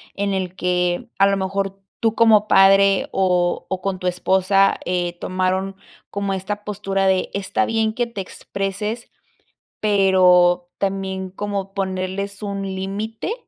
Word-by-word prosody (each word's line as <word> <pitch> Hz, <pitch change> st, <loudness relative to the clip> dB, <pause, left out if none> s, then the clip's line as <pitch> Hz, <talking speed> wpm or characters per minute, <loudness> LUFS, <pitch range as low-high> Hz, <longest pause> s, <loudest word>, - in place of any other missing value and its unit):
en 200 Hz, 0 st, -1 dB
el 185 Hz, -1 st, -3 dB
que, 180 Hz, +5 st, -1 dB
a 195 Hz, -, +6 dB
lo 195 Hz, 0 st, +1 dB
mejor, 195 Hz, 0 st, -2 dB, 0.2 s
tú 225 Hz, -1 st, +1 dB
como 215 Hz, -2 st, +5 dB
padre 195 Hz, 0 st, +5 dB
o 180 Hz, -2 st, +1 dB
o 190 Hz, -1 st, -3 dB
con 190 Hz, -1 st, -2 dB
tu 180 Hz, -, -3 dB
esposa, 190 Hz, +2 st, +2 dB
eh, 175 Hz, -1 st, -2 dB
tomaron 185 Hz, +1 st, -1 dB, 0.3 s
como 200 Hz, -1 st, -2 dB
esta 205 Hz, +2 st, -4 dB
postura 195 Hz, -2 st, -1 dB
de 190 Hz, -1 st, +1 dB
está 200 Hz, +6 st, -1 dB
bien 220 Hz, -1 st, 0 dB
que 240 Hz, +1 st, -1 dB
te 225 Hz, -4 st, -6 dB
expreses, 200 Hz, +5 st, -5 dB, 0.7 s
pero 180 Hz, -3 st, +4 dB
también 190 Hz, -1 st, -3 dB
como 195 Hz, 0 st, -4 dB
ponerles 190 Hz, +1 st, -3 dB
un 200 Hz, -1 st, -4 dB
límite, 200 Hz, -, -4 dB
195 Hz, 140 wpm, -21 LUFS, 185-200 Hz, 0.7 s, a